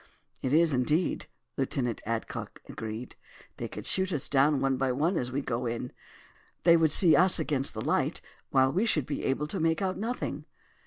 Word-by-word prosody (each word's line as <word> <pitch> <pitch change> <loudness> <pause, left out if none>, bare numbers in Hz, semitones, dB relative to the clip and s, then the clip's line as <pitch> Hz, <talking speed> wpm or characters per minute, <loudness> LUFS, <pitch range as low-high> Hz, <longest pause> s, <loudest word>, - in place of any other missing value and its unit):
"It 130 - -2
is, 160 0 +4
indeed," 150 +7 0 0.3
Lieutenant 130 -3 -2
Adcock 115 0 -4
agreed. 110 +2 -7 0.4
"They - - -4
could - - -8
shoot 190 0 0
us 150 -6 -1
down 140 +1 +3
one 135 0 +1
by 130 0 0
one 155 +9 0
as 125 -5 -1
we 140 +2 -1
go 120 -1 -2
in. 120 +2 -4 0.7
They 170 0 +6
would 160 -2 +3
see 170 0 +6
us 185 0 +6
against 140 -3 0
the - - -5
light, - - 0 0.3
while 130 0 +3
we 200 +7 +1
should 155 - +1
be 145 - -4
able 135 +3 0
to 180 +5 -4
make 160 0 +1
out 190 -2 -2
nothing." 235 +4 -4
145 Hz, 190 wpm, -28 LUFS, 130-170 Hz, 0.7 s, They